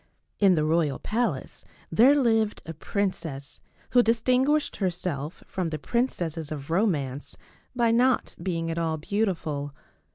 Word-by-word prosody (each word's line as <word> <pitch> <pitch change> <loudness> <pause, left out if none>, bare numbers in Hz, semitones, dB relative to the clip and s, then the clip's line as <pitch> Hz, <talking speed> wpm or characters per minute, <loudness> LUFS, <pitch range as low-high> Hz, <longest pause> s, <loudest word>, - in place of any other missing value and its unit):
In 195 -3 +5
the 155 -1 +1
royal 155 -4 +1
palace 215 - -2 0.3
there 245 - +6
lived 225 -4 +1
a 165 - -6
princess 160 -6 -3 0.3
who 245 - +6
dis 230 -1 +1
tinguished 265 +4 +2
herself 175 -5 -3
from 185 -3 -3
the 160 -1 -3
princesses 165 - -2
of 145 0 -6
romance 150 - -1 0.4
by 235 -2 +3
not 250 +2 +2
being 165 -3 -2
at 165 - -2
all 160 -1 -1
beautiful. 155 -6 -2
175 Hz, 135 wpm, -26 LUFS, 155-225 Hz, 0.4 s, there